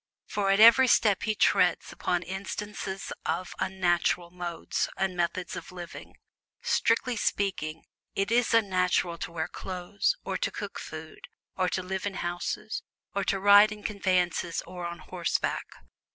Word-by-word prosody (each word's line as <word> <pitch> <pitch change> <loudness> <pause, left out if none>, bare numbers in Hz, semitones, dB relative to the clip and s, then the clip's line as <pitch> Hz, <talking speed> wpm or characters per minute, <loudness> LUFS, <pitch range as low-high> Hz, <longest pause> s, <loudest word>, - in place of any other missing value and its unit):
For 200 -1 -1
at 195 +1 +4
every 230 +4 +9
step 210 -5 +4
he 215 -1 0
treads - - +3
upon 175 -1 -1
instances 195 +1 -5
of 175 +3 -2
"unnatural" 175 -2 +1
modes 175 -1 -3
and 190 -1 0
methods 175 0 -1
of - - -8
living. 175 -2 -9 0.5
Strictly 255 - +2
speaking, 190 -7 -1 0.3
it 195 +2 0
is 240 0 +3
"unnatural" 180 -5 +2
to - - -5
wear 160 -1 -2
clothes, 185 +2 -2
or - - -1
to - - -1
cook - - -6
food, - - -9 0.3
or 185 -1 +1
to 185 - -2
live 190 +2 -3
in 195 - -4
houses, 175 +5 -3 0.3
or 200 - 0
to 195 - +1
ride 205 +2 +7
in 210 0 -8
conveyances 180 -5 0
or 180 0 -6
on 170 0 -6
horseback. 175 +1 -2
190 Hz, 150 wpm, -28 LUFS, 175-205 Hz, 0.5 s, every